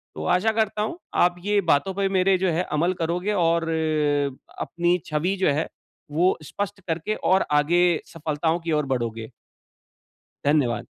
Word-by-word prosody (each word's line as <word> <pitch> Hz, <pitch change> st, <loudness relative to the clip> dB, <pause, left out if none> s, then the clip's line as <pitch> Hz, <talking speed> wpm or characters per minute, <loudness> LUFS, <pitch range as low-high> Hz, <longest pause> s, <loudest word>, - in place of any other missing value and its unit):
तो 75 Hz, -, -5 dB
आशा 220 Hz, +5 st, +2 dB
करता 215 Hz, -1 st, 0 dB
हूँ 225 Hz, +11 st, -4 dB, 0.2 s
आप 175 Hz, 0 st, +4 dB
ये 205 Hz, 0 st, +3 dB
बातों 175 Hz, +7 st, +3 dB
पे 200 Hz, 0 st, +1 dB
मेरे 190 Hz, 0 st, +3 dB
जो 185 Hz, -1 st, +1 dB
है 170 Hz, +3 st, 0 dB
अमल 170 Hz, +4 st, +1 dB
करोगे 180 Hz, +5 st, -1 dB
और, 165 Hz, -3 st, +1 dB, 0.9 s
अपनी 175 Hz, +1 st, +1 dB
छवि 160 Hz, +6 st, -1 dB
जो 185 Hz, -, +2 dB
है 155 Hz, +3 st, -1 dB, 0.4 s
वो 175 Hz, +5 st, +2 dB
स्पष्ट 195 Hz, +5 st, -5 dB
करके 170 Hz, +6 st, -1 dB, 0.2 s
और 190 Hz, 0 st, +4 dB
आगे 150 Hz, +4 st, +3 dB, 0.3 s
सफलताओं 160 Hz, +1 st, -1 dB
की 165 Hz, 0 st, -4 dB
ओर 150 Hz, -1 st, +1 dB
बढ़ोगे। 115 Hz, -2 st, -4 dB, 1.2 s
धन्यवाद। 140 Hz, -5 st, +2 dB
170 Hz, 155 wpm, -24 LUFS, 150-190 Hz, 1.2 s, आप